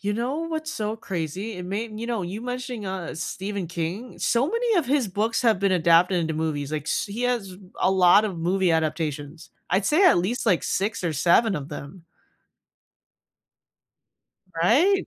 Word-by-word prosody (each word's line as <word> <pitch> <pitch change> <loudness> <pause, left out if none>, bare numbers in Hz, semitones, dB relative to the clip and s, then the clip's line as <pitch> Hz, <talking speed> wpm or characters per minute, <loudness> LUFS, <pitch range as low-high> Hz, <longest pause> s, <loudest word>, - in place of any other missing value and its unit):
You 205 +1 -1
know 245 +8 -2
what's 320 -1 -3
so 215 -7 -3
crazy? 190 +1 -4
It 180 - -6
made 215 +4 -4
you 230 - -4
know, 235 -4 -2
you 185 +5 -5
mentioning, 250 -2 -5
uh, 190 -2 -4
Stephen 190 +3 -4
King, 175 +8 -5
so 240 +3 +2
many 465 +1 +1
of 320 - 0
his 265 -4 +1
books 215 +4 0
have 225 -5 +3
been 195 -1 +2
adapted 175 +1 +4
into 160 -1 -2
movies, 155 -2 -2
like, 155 -2 -2
s 230 +8 -1
he 210 +4 -5
has 235 -7 -1 0.2
a - - +3
lot 190 +2 +5
of 195 -5 -3
movie 180 +2 +1
adaptations. 155 -1 -2 0.2
I'd 190 +3 +2
say 325 +6 +4
at 350 - +6
least, 200 +8 -1
like, 185 -6 +3
6 200 +2 -1
or 165 - 0
7 185 - +3
of 140 -1 -6
them. 150 +4 -9 2.5
Right? 290 - +3
195 Hz, 175 wpm, -24 LUFS, 170-235 Hz, 2.5 s, at